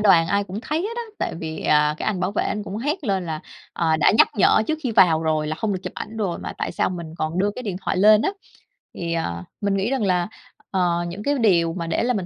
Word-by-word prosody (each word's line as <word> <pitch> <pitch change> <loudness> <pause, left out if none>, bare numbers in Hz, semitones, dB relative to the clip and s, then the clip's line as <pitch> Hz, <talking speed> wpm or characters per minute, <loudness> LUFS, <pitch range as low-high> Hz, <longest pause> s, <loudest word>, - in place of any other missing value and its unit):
đoàn 185 -6 +5
ai 200 0 +1
cũng 200 +3 -6
thấy 305 +5 -2
hết 440 +3 -3
đó, 475 - -2 0.2
tại - - -2
vì, 160 -1 -5
à, 150 0 +3
cái - - -4
anh 200 -4 0
bảo 185 +2 -1
vệ - - 0
anh 210 - -2
cũng 205 0 -6
hét 295 - -2
lên 190 -4 0
là, 155 -1 -3 0.3
ờ, 160 -1 +1
đã 155 - +4
nhắc - - +7
nhở 210 +1 +4
trước 315 0 -1
khi 250 - -1
vào 170 -6 +5
rồi 155 -1 0
là 155 +1 -3
hông 215 -2 0
được 185 - -2
chụp - - -5
ảnh 225 +1 -7
rồi 195 -6 -2
mà - - -5
tại - - -2
sao - - 0
mình 170 -3 -6
còn 155 +3 -2
đưa 205 +2 +2
cái 250 - -6
điện 195 -5 -3
thoại - - 0
lên 210 +3 +6
á. - - +1 0.6
Thì, 170 -1 -3
ờ, 85 - -2 0.2
mình 200 -1 +1
nghĩ 200 +5 0
rằng 260 -5 0
là, 180 -2 +1 0.4
ờ, 175 -2 +1
những 195 +5 -6
cái 285 0 +1
điều 170 -7 +3
mà 170 -2 -4
để 170 - 0
là 250 +1 +1
mình 195 -5 -2
185 Hz, 280 wpm, -23 LUFS, 165-215 Hz, 0.6 s, nhắc